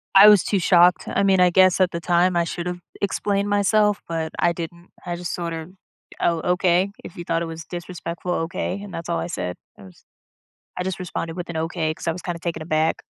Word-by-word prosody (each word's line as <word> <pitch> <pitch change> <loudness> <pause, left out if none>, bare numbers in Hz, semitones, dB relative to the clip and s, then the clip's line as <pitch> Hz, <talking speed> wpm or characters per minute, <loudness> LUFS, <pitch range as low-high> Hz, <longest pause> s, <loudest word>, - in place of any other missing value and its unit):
I 200 +2 +10
was 210 -3 +7
too 200 - 0
shocked. 180 0 +4
I 200 - 0
mean, 195 -1 +4
I 180 0 +6
guess 185 +1 +4
at 185 -1 +3
the 170 - -3
time, 175 +2 +2
I 170 - +3
should 170 +1 -4
have 180 0 -4 0.2
explained 200 0 0
myself, 205 0 +2
but 160 -1 -3
I 175 - +3
didn't. 170 +1 -7 0.2
I 175 - -3
just 175 -1 -5
sort 170 -1 -3
of, 160 +2 -7 0.5
"Oh, 170 -1 +1
okay. 180 +1 +2
If - - -10
you 175 - -6
thought 165 0 -1
it - - -1
was 165 0 -7
disrespectful, 175 0 -6
okay." 185 +4 -4
And 205 - -9
that's 165 - -6
all 170 - 0
I - - -3
said. 90 - -4 0.2
I - - -14
was 95 -2 -16 0.7
I - - -1
just 185 0 -3
responded 170 -2 -5
with 175 - -5
an 170 - -5
okay 160 -1 -1
'cause 165 - -6
I - - +2
was 180 - -7
kinda 170 -2 -4
taken 170 -2 -3
aback. 155 0 0
175 Hz, 230 wpm, -23 LUFS, 165-185 Hz, 0.7 s, I